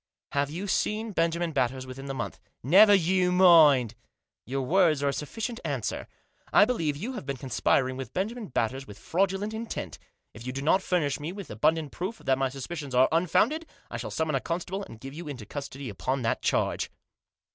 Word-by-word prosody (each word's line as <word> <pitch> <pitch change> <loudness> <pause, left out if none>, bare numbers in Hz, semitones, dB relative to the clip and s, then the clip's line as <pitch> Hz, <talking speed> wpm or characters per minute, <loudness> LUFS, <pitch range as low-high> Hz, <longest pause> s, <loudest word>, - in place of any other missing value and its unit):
" - - -67
Have 140 0 0
you 175 +6 -5
seen 215 +2 0
Benjamin 170 -1 0
Batters 130 -2 -1
within 135 +2 -8
the 135 - -4
month?" - - -5 0.2
" - - -52
Never 205 0 +9
you 180 0 +2
mind! 155 - +6 0.2
" - - -58
" - - -66
Your 135 +2 -2
words 160 -1 +3
are 140 - +3
a - - -1
sufficient 225 - -4
answer. 135 -8 -3 0.4
I 205 - +7
believe 165 -12 -1
that 145 - -9
you 255 +5 -3
have 150 - -7
been 140 -1 -2
conspiring 130 0 +1
with 130 -4 -6
Benjamin 215 - -3
Batters 130 +2 -2
with 105 - -11
fraudulent 195 - -1
intent. 220 - -5 0.3
If 110 - -11
you 125 - -3
do 135 +1 -4
not 185 +6 +3
furnish 155 -8 0
me 150 +3 -4
with 200 0 -8
abundant 150 +7 +1
proof 190 +6 -4
that 135 0 0
my 135 -1 +1
suspicions 140 0 -6
are 130 +1 +5
unfounded 210 - +2 0.2
I - - -3
shall - - -5
summon 160 -1 -1
a 135 - +2
constable, 180 +6 -3
and 115 - -12
give 135 +3 -8
you 165 +1 -8
into 130 -7 -7
custody 140 +2 -6
upon 130 +5 -2
that 115 - 0
charge. - - 0
150 Hz, 210 wpm, -27 LUFS, 135-190 Hz, 0.4 s, Never